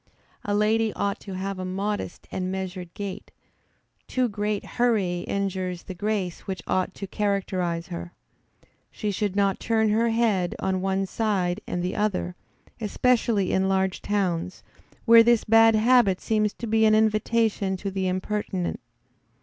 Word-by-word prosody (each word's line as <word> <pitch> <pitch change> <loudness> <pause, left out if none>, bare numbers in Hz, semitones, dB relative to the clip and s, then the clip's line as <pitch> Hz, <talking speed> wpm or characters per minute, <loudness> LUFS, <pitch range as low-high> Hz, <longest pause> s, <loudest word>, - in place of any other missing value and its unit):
A 205 - -1
lady 220 +1 +2
ought 200 0 -2
to 195 -2 -8
have 195 0 -4
a - - -3
modest 195 +1 -3
and 185 0 -2
measured 185 -2 -5
gait; 200 0 -6 0.8
too 255 -1 +1
great 210 -1 -2
hurry 210 -8 +1
injures 185 -3 -2
the 185 - -7
grace 190 -2 -2
which 190 -1 -4
ought 185 +1 -1
to 200 - -5
characterize 185 -4 -1
her. 175 0 -6 0.8
She 210 -2 -3
should 200 0 -2
not 200 -1 +2
turn 220 -1 +1
her 225 +2 +2
head 220 -6 +1
on 190 -1 -1
one 195 0 0
side 195 -2 -1
and 175 - -2
the 180 - -2
other, 195 -4 -1 0.5
especially 220 -2 +1
in 190 0 +2
large 190 -1 0
towns, 185 -3 -1 0.4
where 230 -1 +9
this 235 -1 +4
bad 225 0 +6
habit 220 -4 +4
seems 215 -1 +1
to 235 - -7
be 220 0 +2
an 215 0 +5
invitation 215 -2 +1
to 195 +1 -4
the 190 -1 -1
impertinent. 185 0 -2
200 Hz, 150 wpm, -25 LUFS, 185-215 Hz, 0.8 s, where